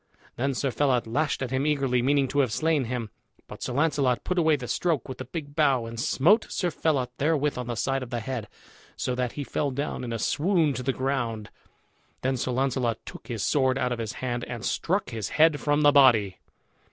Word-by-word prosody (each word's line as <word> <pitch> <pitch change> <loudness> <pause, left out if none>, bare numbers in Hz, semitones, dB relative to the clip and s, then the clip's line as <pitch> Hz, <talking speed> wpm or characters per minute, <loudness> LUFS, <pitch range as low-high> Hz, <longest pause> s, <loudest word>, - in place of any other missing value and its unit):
Then 135 +2 -1
Sir 135 +1 -1
Phelot 130 -3 +1
lashed 135 +4 -1
at 130 - -4
him 130 +1 0
eagerly, 135 -4 +1
meaning 140 +1 +2
to 145 - 0
have 130 -5 +2
slain 155 +1 +1
him. 115 -3 -4 0.4
But - - -10
Sir 125 - -3
Launcelot 140 -3 +1
put 180 -1 0
away 160 -2 +4
the 125 -4 -6
stroke, 165 +1 0
with 130 - -7
the 130 - -5
big 145 +2 -7
bough, 140 -6 +3
and 115 0 -7
smote 170 - +3
Sir 175 -2 -1
Phelot 140 -6 0
therewith 150 -1 +1
on 125 -1 -5
the 120 - -3
side 135 +5 -1
of 130 - -6
the 120 -1 -2
head, 120 -2 -4 0.5
so 125 - -2
that 125 -1 -2
he 145 - -4
fell 145 +1 -1
down 140 0 -3
in 120 - -4
a 115 - -1
swoon 155 - +1
to 130 - -4
the 130 +1 0
ground. 125 -5 -2 0.7
Then 130 +1 +1
Sir 130 - -2
Launcelot 125 -3 0
took - - -10
his 115 -5 -3
sword 130 -2 +2
out 125 -1 0
of 120 - -2
his 110 -2 -3
hand 120 -1 -3
and 120 -2 -6
struck 185 -6 -1
his 110 -5 -4
head 155 -1 +5
from 145 0 +1
the 145 - +7
body. 120 -9 +5
130 Hz, 220 wpm, -26 LUFS, 120-145 Hz, 0.7 s, the